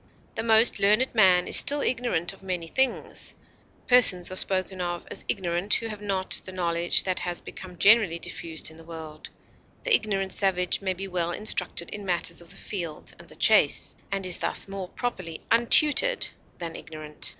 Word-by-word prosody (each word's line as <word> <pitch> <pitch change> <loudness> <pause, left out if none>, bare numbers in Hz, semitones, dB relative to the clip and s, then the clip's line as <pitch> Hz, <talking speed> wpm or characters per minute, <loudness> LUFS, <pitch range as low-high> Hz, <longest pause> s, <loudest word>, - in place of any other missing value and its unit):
The - - -3
most 225 +1 +4
learned 215 +6 +3
man 185 -5 +4
is - - +3
still 285 +1 +3
ignorant 235 -10 -1
of 195 - -17
many 180 -3 -3
things; 265 +10 -1 0.5
persons 195 -8 +4
are - - -5
spoken 185 0 -1
of 175 -1 -4
as - - -3
ignorant 175 +2 0
who 230 - -3
have 210 -1 -8
not 195 -2 -2
the 185 - -9
knowledge 170 -2 +3
that 185 -1 -1
has 175 -1 -3
become 180 -1 -11
generally 210 -5 +5
diffused 160 -1 -5
in 160 - -15
the 165 - -14
world; 160 -2 -10 0.5
the - - +1
ignorant 195 - +1
savage 185 -2 0
may 190 -1 -2
be 195 +2 -6
well 175 -2 -2
instructed 180 -3 -1
in 210 - -6
matters 175 -2 -1
of 170 - -13
the 190 - -10
field 170 -6 -6
and - - -14
the - - -15
chase, - - +3 0.2
and 195 -1 -2
is 180 -2 -1
thus - - -3
more 195 -2 -7
properly 185 -10 -5
untutored 295 - +4 0.3
than 165 -2 -6
ignorant. 155 -1 -6
185 Hz, 180 wpm, -25 LUFS, 175-210 Hz, 0.5 s, generally